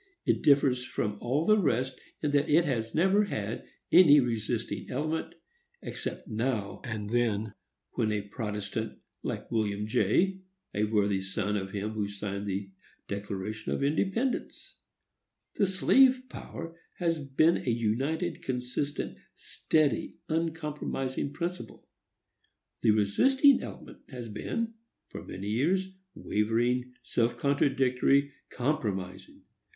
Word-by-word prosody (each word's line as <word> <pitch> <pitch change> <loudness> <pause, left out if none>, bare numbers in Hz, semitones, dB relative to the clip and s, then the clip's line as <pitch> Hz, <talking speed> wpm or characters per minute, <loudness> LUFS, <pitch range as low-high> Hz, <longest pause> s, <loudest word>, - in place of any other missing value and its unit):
It - - +2
differs 135 -3 +4
from 105 -4 -3
all 140 +7 0
the 215 0 +5
rest 130 - 0 0.2
in 150 - +1
that 145 +1 +2
it 165 +3 +5
has 115 -6 -2
never 190 +5 +4
had 110 - -4 0.2
any 150 -5 +8
resisting 115 -4 -2
element, 155 +5 -2 0.5
except - - -5
now 110 -2 -2
and 110 -3 -4
then 110 -3 +1 0.5
a 105 -2 +1
protestant, 105 -1 -4 0.2
like - - -5
William 105 -2 0
Jay, 170 - +2 0.3
a 105 +1 +1
worthy 105 -2 +1
son 100 +2 -2
of 95 -2 -2
him 105 +2 -3
who 105 -2 -2
signed 100 0 -5
the 95 0 -3 0.4
Declaration 100 +2 -4
of - - -1
Independence. 195 - -1 0.8
The 200 - +3
slave 255 +7 +5
power 165 -7 -8 0.2
has 165 -3 0
been 150 +4 +3
a - - -3
united, 135 +9 0
consistent, 125 +3 -3 0.2
steady, 155 -3 0
uncompromising 150 -4 -2
principle. 170 - -5 0.9
The - - +3
resisting 260 - +5
element - - -9
has 120 -4 -7
been, 230 - -3 0.4
for - - -8
many 100 +2 -6
years, 185 - +1 0.2
wavering, 120 +4 0
self 120 0 0
contradictory, 140 0 +2 0.2
compromising. 100 -9 -3
125 Hz, 115 wpm, -29 LUFS, 105-155 Hz, 0.9 s, any